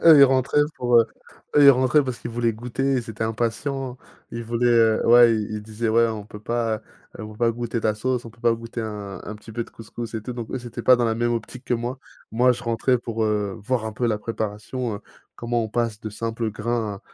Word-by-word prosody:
Eux, 160 Hz, -3 st, +9 dB
ils -, -, +11 dB
rentraient 135 Hz, +2 st, +3 dB
pour, 125 Hz, -1 st, 0 dB
heu 115 Hz, -, +4 dB, 0.5 s
eux 145 Hz, -, +7 dB
ils 140 Hz, -, +11 dB
rentraient 130 Hz, +3 st, +4 dB
parce 130 Hz, -2 st, -4 dB
qu'ils 120 Hz, -, -6 dB
voulaient 115 Hz, 0 st, 0 dB
goûter, 125 Hz, +4 st, -2 dB
ils 120 Hz, -3 st, -2 dB
étaient 110 Hz, +1 st, -3 dB
impatients, 125 Hz, +3 st, -2 dB, 0.3 s
ils 115 Hz, 0 st, -5 dB
voulaient, 120 Hz, +1 st, 0 dB
heu 115 Hz, -2 st, +4 dB
ouais, 120 Hz, -1 st, +7 dB
i 105 Hz, -1 st, -1 dB
ils 105 Hz, -, -6 dB
disaient: 110 Hz, +1 st, -3 dB
«Ouais, 115 Hz, +1 st, +4 dB
on 110 Hz, -2 st, -5 dB
peut 105 Hz, 0 st, -11 dB
pas 115 Hz, -1 st, -1 dB, 0.4 s
on 110 Hz, -, -6 dB
peut -, -, -14 dB
pas 115 Hz, +1 st, +2 dB
goûter 120 Hz, 0 st, -3 dB
ta 110 Hz, -1 st, +1 dB
sauce? 125 Hz, +2 st, -1 dB
On 115 Hz, -, -9 dB
peut 115 Hz, -, -22 dB
pas 115 Hz, -1 st, +4 dB
goûter 115 Hz, +1 st, -6 dB
un 105 Hz, -4 st, -6 dB
un 105 Hz, -, -6 dB
petit 110 Hz, +1 st, -13 dB
peu 120 Hz, +1 st, -2 dB
de -, -, -17 dB
couscous?», 115 Hz, +1 st, -8 dB
et 110 Hz, -, -3 dB
tout 125 Hz, -, -5 dB
donc, 120 Hz, -2 st, -6 dB
eux, 130 Hz, -, -2 dB
c'était 120 Hz, -1 st, -7 dB
pas 125 Hz, -1 st, +6 dB
dans 120 Hz, -, +1 dB
la 115 Hz, -, +1 dB
même 120 Hz, +1 st, 0 dB
optique 125 Hz, +2 st, -6 dB
que 125 Hz, -, +1 dB
moi. 120 Hz, +3 st, -3 dB, 0.3 s
Moi 125 Hz, +2 st, +4 dB
je 120 Hz, -, -7 dB
rentrais 120 Hz, +2 st, +1 dB
pour, 115 Hz, -2 st, -2 dB
heu, 105 Hz, -1 st, -1 dB
voir 120 Hz, 0 st, -1 dB
un 110 Hz, -, -4 dB
peu 120 Hz, +3 st, -1 dB
la 110 Hz, -2 st, +1 dB
préparation, 110 Hz, +1 st, -4 dB, 0.4 s
comment 120 Hz, 0 st, -1 dB
on 110 Hz, -, -3 dB
passe 115 Hz, -1 st, -1 dB
de 110 Hz, -, -5 dB
simples 115 Hz, +1 st, -3 dB
grains 110 Hz, -2 st, -2 dB
115 Hz, 245 wpm, -23 LUFS, 110-120 Hz, 0.5 s, ils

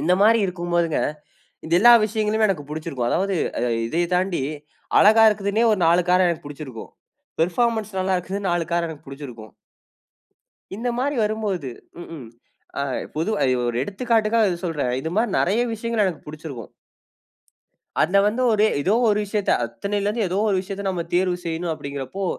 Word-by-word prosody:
இந்த 180 Hz, -, +2 dB
மாரி 225 Hz, +2 st, +5 dB
இருக்கும் 175 Hz, -1 st, -5 dB
போதுங்க, 170 Hz, -2 st, +1 dB, 0.6 s
இந்த 160 Hz, -, 0 dB
எல்லா 240 Hz, +3 st, +8 dB
விஷயங்களுமே 215 Hz, 0 st, +1 dB
எனக்கு 150 Hz, -7 st, -3 dB
பிடிச்சிருக்கும். 150 Hz, -6 st, -3 dB
அதாவது, 195 Hz, 0 st, 0 dB, 0.2 s
அ -, -, -2 dB, 0.3 s
இதைய 170 Hz, +6 st, 0 dB
தாண்டி 180 Hz, -5 st, 0 dB, 0.6 s
அழகா 220 Hz, +2 st, +6 dB
இருக்குதுன்னே 210 Hz, +2 st, 0 dB
ஒரு 205 Hz, -, 0 dB
4 170 Hz, +2 st, +4 dB
கார 180 Hz, 0 st, +4 dB
எனக்கு 165 Hz, -3 st, -3 dB
புடிச்சிருக்கும். 140 Hz, -6 st, -8 dB, 0.5 s
பெர்ஃபார்மன்ஸ் 215 Hz, +4 st, 0 dB
நல்லா 190 Hz, 0 st, 0 dB
இருக்குதுன்னு 190 Hz, +2 st, -3 dB
நாலு 175 Hz, -1 st, 0 dB
கார் 170 Hz, 0 st, +1 dB
எனக்கு 155 Hz, -4 st, -10 dB
புடிச்சிருக்கும். 125 Hz, -6 st, -10 dB, 1.2 s
இந்த 235 Hz, +3 st, -3 dB
மாரி 285 Hz, +2 st, 0 dB
வரும்போது 205 Hz, -, -2 dB, 0.3 s
ம்ஹ்ம். 155 Hz, -8 st, -9 dB, 0.5 s
அ -, -, 0 dB, 0.3 s
பொதுவா 170 Hz, +8 st, -1 dB
அ -, -, +3 dB, 0.2 s
ஒரு 120 Hz, -, -2 dB
எடுத்துக்காட்டுக்கா 225 Hz, -, +1 dB, 0.2 s
சொல்றன். 150 Hz, -8 st, -1 dB
இது 160 Hz, -, -4 dB
மாரி 225 Hz, 0 st, +2 dB
நிறைய 200 Hz, +6 st, +2 dB
விஷயங்கள 225 Hz, -1 st, 0 dB
எனக்கு 175 Hz, -4 st, -5 dB
புடிச்சிருக்கும். 150 Hz, -6 st, -8 dB, 1.3 s
அதுல 180 Hz, +5 st, +3 dB
வந்து 225 Hz, +5 st, 0 dB
ஒரே 215 Hz, 0 st, +4 dB
ஏதோ 185 Hz, +8 st, +1 dB, 0.2 s
ஒரு 210 Hz, -1 st, +2 dB
விஷயத்த 205 Hz, 0 st, -1 dB
அத்தனையில 200 Hz, -, -3 dB
இருந்து 215 Hz, 0 st, 0 dB
ஏதோ 185 Hz, +3 st, -1 dB
ஒரு 195 Hz, -, +2 dB
விஷயத்த 195 Hz, +1 st, -6 dB
நம்ம 180 Hz, -3 st, -1 dB
தேர்வு 180 Hz, 0 st, +2 dB
செய்யணும் 165 Hz, 0 st, -2 dB
அப்டிங்கிறப்போ, 140 Hz, +4 st, -5 dB
185 Hz, 155 wpm, -22 LUFS, 160-210 Hz, 1.3 s, எல்லா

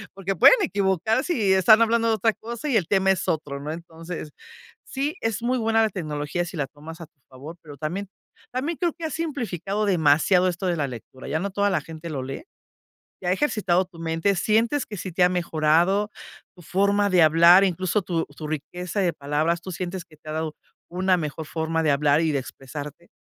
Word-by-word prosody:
porque 195 Hz, 0 st, -3 dB
pueden 180 Hz, -, +8 dB
equivocar 200 Hz, -, +1 dB
si 220 Hz, -, +1 dB
están 205 Hz, +4 st, +6 dB
hablando 230 Hz, 0 st, +2 dB
de 225 Hz, -, +3 dB
otra 220 Hz, +1 st, +1 dB
cosa 235 Hz, +6 st, -7 dB
y 250 Hz, -, +3 dB
el 180 Hz, -6 st, 0 dB
tema 195 Hz, 0 st, +3 dB
es 190 Hz, -, -1 dB
otro, 145 Hz, -3 st, -2 dB
¿no? 145 Hz, +2 st, -5 dB
Entonces, 165 Hz, -1 st, -8 dB, 0.5 s
sí, 280 Hz, +3 st, -2 dB
es 225 Hz, -1 st, -1 dB
muy 250 Hz, +2 st, +1 dB
buena 225 Hz, 0 st, +2 dB
la 220 Hz, -, +2 dB
tecnología 155 Hz, -1 st, -3 dB
si 175 Hz, -, -8 dB
la 145 Hz, -, 0 dB
tomas 155 Hz, +3 st, -11 dB
a -, -, -7 dB
tu 150 Hz, -, -51 dB
favor, 140 Hz, +6 st, -10 dB
pero 145 Hz, -3 st, -11 dB
también 180 Hz, +7 st, -4 dB, 0.4 s
también 285 Hz, +6 st, -2 dB
creo 345 Hz, -3 st, 0 dB
que 335 Hz, -1 st, -7 dB
ha 315 Hz, -, -3 dB
simplificado 215 Hz, -, -3 dB
demasiado 180 Hz, +1 st, +3 dB
esto 180 Hz, +2 st, -4 dB
de 175 Hz, -1 st, 0 dB
la 145 Hz, -2 st, 0 dB
lectura, 130 Hz, +1 st, -10 dB
ya 155 Hz, -, -1 dB
no 200 Hz, +3 st, -3 dB
toda 205 Hz, +1 st, +1 dB
la 190 Hz, -, +1 dB
gente 160 Hz, +2 st, -9 dB
lo 140 Hz, -4 st, -4 dB
lee. 135 Hz, -, -6 dB, 0.8 s
¿Y -, -, -5 dB
ha 180 Hz, -, +2 dB
ejercitado 195 Hz, -7 st, +1 dB
tu 175 Hz, -2 st, -17 dB
mente? 165 Hz, +4 st, 0 dB
¿Sientes 225 Hz, +8 st, +1 dB
que 210 Hz, -, -7 dB
sí 185 Hz, 0 st, -6 dB
te 180 Hz, -, +1 dB
ha -, -, +5 dB
mejorado 175 Hz, +3 st, +1 dB, 0.5 s
tu 175 Hz, -, -15 dB
forma 200 Hz, +4 st, +1 dB
de 180 Hz, -2 st, +5 dB
hablar, 170 Hz, +4 st, +7 dB
incluso 185 Hz, +2 st, 0 dB
tu 170 Hz, -2 st, -1 dB
tu 145 Hz, +2 st, -9 dB
riqueza 175 Hz, +5 st, -4 dB
de 180 Hz, -3 st, +1 dB
palabras? 150 Hz, +4 st, -1 dB
¿Tú 185 Hz, -, -7 dB
sientes 180 Hz, +1 st, -5 dB
que 160 Hz, -3 st, -19 dB
te 155 Hz, +1 st, -10 dB
ha -, -, -4 dB
dado 155 Hz, 0 st, -3 dB, 0.3 s
una 185 Hz, +1 st, +2 dB
mejor 155 Hz, 0 st, -4 dB
forma 165 Hz, +1 st, -2 dB
de 155 Hz, -, +2 dB
hablar 145 Hz, +2 st, +3 dB
y 160 Hz, -2 st, +1 dB
de 140 Hz, -, +1 dB
expresarte? 145 Hz, +5 st, -9 dB
180 Hz, 210 wpm, -24 LUFS, 155-205 Hz, 0.8 s, pueden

